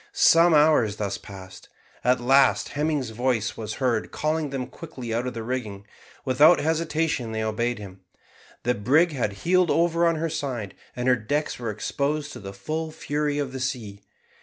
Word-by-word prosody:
Some 175 - +5
hours 150 -9 +4
thus 100 -2 -3
passed. 95 -2 -12 0.3
At 125 +1 +3
last 135 +2 +3
Hemming's 145 -5 -1
voice 115 -1 -1
was 110 -1 -5
heard 120 -5 0
calling 155 0 -1
them 135 -2 -3
quickly 125 -4 -8
out 120 +2 -1
of 125 - -5
the 115 - -4
rigging; 110 -5 -4 0.4
without 145 +6 +5
hesitation 160 -6 -1
they 110 0 -2
obeyed 115 +2 -1
him. 95 -2 -10 0.6
The 125 - +2
brig 145 +11 +3
had 120 -8 -2
heeled 180 0 +3
over 170 0 +2
on 165 - +2
her 160 +1 -1
side, 130 - -4 0.2
and 125 0 -2
her 130 - +5
decks 145 +7 -2
were 120 -2 -3
exposed 145 +7 -2
to - - -8
the 95 -1 -8
full 155 +10 -4
fury 150 -1 -2
of 140 -3 -2
the 130 - -5
sea. 115 -6 -4
130 Hz, 175 wpm, -25 LUFS, 110-155 Hz, 0.6 s, Some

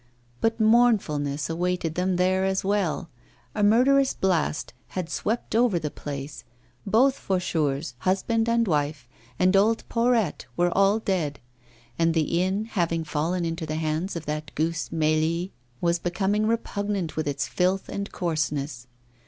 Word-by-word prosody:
But 225 +1 0
mournfulness 200 -12 +3
awaited 175 0 -1
them 180 +2 0
there 185 +1 +2
as 190 0 0
well; 190 -3 -1 0.4
a - - -2
murderous 260 +6 +4
blast 175 -5 0
had 180 -3 -5
swept 225 0 -2
over 230 -5 +3
the 150 -3 -3
place, 140 0 -7 0.4
both 250 +7 +4
Faucheurs, 160 -6 -1
husband 225 - +1
and 230 -1 +2
wife, 145 -5 -1 0.3
and 185 +1 +3
old 220 +3 +3
Porrette, 235 -3 +1
were 175 0 +2
all 200 +2 +4
dead; 180 -9 -1 0.6
and 165 0 +2
the 165 +2 +1
inn, 190 +4 0
having 170 -6 -1
fallen 165 +3 -1
into 165 0 -3
the 155 - -3
hands 160 +4 -2
of 165 -2 -5
that 150 0 -4
goose 165 +1 -1
Mélie, 160 +3 0 0.3
was 170 0 +2
becoming 200 +5 0
repugnant 205 -6 -2
with 155 -1 -2
its 140 -1 -1
filth 185 +1 0
and 200 0 -5
coarseness. 150 -7 -2
180 Hz, 145 wpm, -25 LUFS, 155-205 Hz, 0.6 s, murderous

